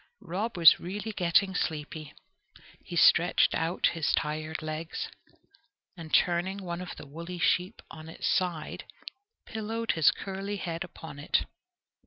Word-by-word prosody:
Rob 195 +4 -3
was 165 -2 +8
really 205 +5 -5
getting 190 0 +2
sleepy. 155 -3 -3 0.7
He - - -7
stretched - - +5
out 165 +2 +1
his 165 -2 0
tired 155 +1 -2
legs, 155 +1 -4 0.9
and, 165 -3 -9
turning 185 +3 +2
one 170 0 -4
of 180 - -7
the - - -9
woolly 170 +5 -7
sheep 180 +4 +1
on 155 0 -10
its 165 - -4
side, 175 -4 -1 0.6
pillowed 225 +1 -2
his 160 -4 +5
curly 195 +1 -4
head 170 -3 -3
upon 160 -4 -10
it. 145 - +1
170 Hz, 135 wpm, -29 LUFS, 160-190 Hz, 0.9 s, was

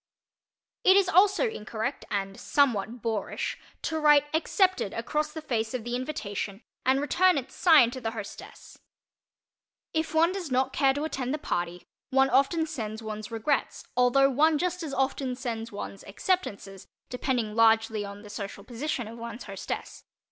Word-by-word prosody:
It 375 +1 +7
is 395 -2 +4
also 390 +6 +4
incorrect 225 - -4
and 195 -1 -3
somewhat 240 -4 +1
boorish 220 -3 -2 0.2
to 320 -1 -1
write 295 -2 +6
"accepted" 370 - +1
across 300 +6 -1
the 315 0 -7
face 230 -4 -1
of 245 - -3
the 240 +1 -3
invitation 215 -6 -4 0.2
and 260 +1 +3
return 350 +5 +3
it 260 - -4
signed 300 -9 +5
to 260 - -6
the 225 - -1
hostess. 220 -3 -9 1.1
If 320 0 -1
one 330 +2 +5
does 370 -5 -4
not 260 0 +1
care 270 -2 +3
to 290 - -2
attend 270 -3 -2
the - - -3
party, 175 - -3 0.3
one 270 0 +3
often 280 +5 +3
sends 220 -6 -5
one's 215 -1 -6
"regrets" 230 +5 -1
although 250 +2 +5
one 305 +4 +4
just 360 +3 -1
as 315 -4 -4
often 270 -1 -1
sends 230 -2 -4
one's 200 -1 -7
"acceptances," 200 - -2 0.2
depending 245 -3 -1
largely 225 -1 +4
upon 200 +1 -8
the 210 - -10
social 200 -1 -6
position 245 0 -3
of 230 +1 -9
one's 235 +1 -7
hostess. 195 -2 -6
250 Hz, 160 wpm, -28 LUFS, 220-305 Hz, 1.1 s, It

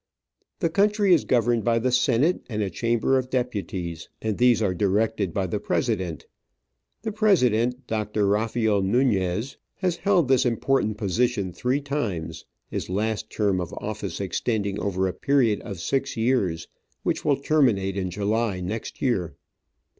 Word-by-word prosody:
The 165 - +2
country 205 0 +3
is 165 - +3
governed 120 -2 +2
by 115 +2 +2
the 125 +2 +1
Senate 130 +6 +2
and 105 -2 -1
a 95 - -3
Chamber 120 +3 +1
of 130 0 -5
Deputies, 95 -10 -3
and 110 -2 -2
these 125 -1 +5
are 100 -4 +1
directed 100 +1 0
by 95 +2 -1
the 90 - -2
President. 85 -4 -1 0.8
The 220 - -2
President, 125 - +2
Doctor 105 -2 -1
Rafael 105 0 +1
Nunez, 105 +1 +1 0.2
has 180 -3 -1
held 185 -7 +2
this 130 -1 +4
important 120 -2 +1
position 105 -1 0
three 125 - 0
times, 125 - -3 0.2
his - - -5
last 110 +3 -1
term 100 -4 0
of 90 - -6
office 105 -4 -5
extending 100 +1 -1
over 95 -1 0
a 90 - -3
period 130 -7 +2
of 100 -6 -7
six 135 +7 -1
years, 110 -9 0 0.4
which - - -1
will 145 -3 +2
terminate 120 -11 +2
in 95 -2 -2
July 105 +1 -1
next 100 +5 -5
year. 95 - 0
110 Hz, 150 wpm, -25 LUFS, 100-130 Hz, 0.8 s, these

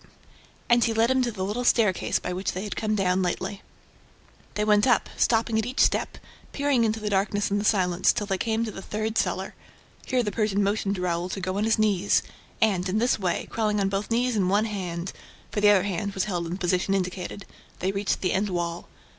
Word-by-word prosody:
And 240 0 +4
he 225 -1 +1
led 230 +3 +3
him 260 0 +3
to 245 -1 0
the 190 -3 -3
little 215 +5 -2
staircase 215 -6 +2
by 180 - -4
which 185 +1 -2
they 185 - -4
had 210 - -5
come 215 -1 -1
down 190 -2 +1
lately. 185 +2 -2 0.9
They 210 - 0
went 210 +2 +4
up, 245 -5 +2
stopping 225 -1 +2
at 220 - -1
each 255 - -5
step, - - +2 0.4
peering 280 -4 +2
into 220 0 0
the 210 -1 -3
darkness 205 +1 0
and 205 0 +1
the - - -4
silence, 185 -4 +3
till 205 - -2
they 195 -2 -2
came 225 +1 0
to 220 - -4
the 195 - -8
third 215 +2 -3
cellar. - - -1 0.5
Here 255 -1 +1
the 210 - -2
Persian 205 -1 0
motioned 200 0 0
to 180 - -5
Raoul 175 0 -1
to 195 - -4
go 185 0 -3
on 205 +2 0
his 225 - +2
knees; 205 -3 +2 0.4
and, 195 -5 +2
in 195 - 0
this 240 0 +2
way, 185 -3 -1
crawling 215 -2 0
on 195 -1 +1
both 195 +1 -2
knees 240 +1 +1
and 190 -3 +1
one 205 +3 +3
hand 185 -4 -4 0.4
for 205 - -2
the 205 - +6
other 200 -3 +5
hand 200 +1 -2
was 190 - +1
held 175 -5 -2
in 165 - -4
the - - -3
position 185 +1 +1
indicated 185 +1 -4 0.3
they 185 +2 -1
reached 195 0 -1
the 185 - 0
end 200 +2 0
wall. 175 -1 -3
205 Hz, 230 wpm, -26 LUFS, 185-220 Hz, 0.9 s, the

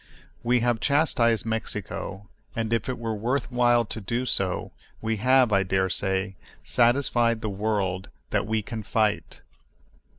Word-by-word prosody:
We 120 0 +2
have 120 -1 +1
chastised 120 -6 +2
Mexico, 105 -2 -4 0.3
and 115 0 -1
if 115 - 0
it 130 - -2
were 115 -1 -3
worth 120 +5 -1
while 120 -1 +3
to 110 +1 -6
do 120 +5 -2
so, 95 -6 -1 0.3
we 110 0 -1
have, 125 0 +4
I 100 - +4
dare 95 0 +1
say, 95 0 0 0.3
satisfied 120 -2 +2
the 110 - -2
world 100 -2 -1 0.2
that - - 0
we 110 -1 0
can 110 +2 -5
fight. 105 0 -1
110 Hz, 145 wpm, -26 LUFS, 100-120 Hz, 0.3 s, have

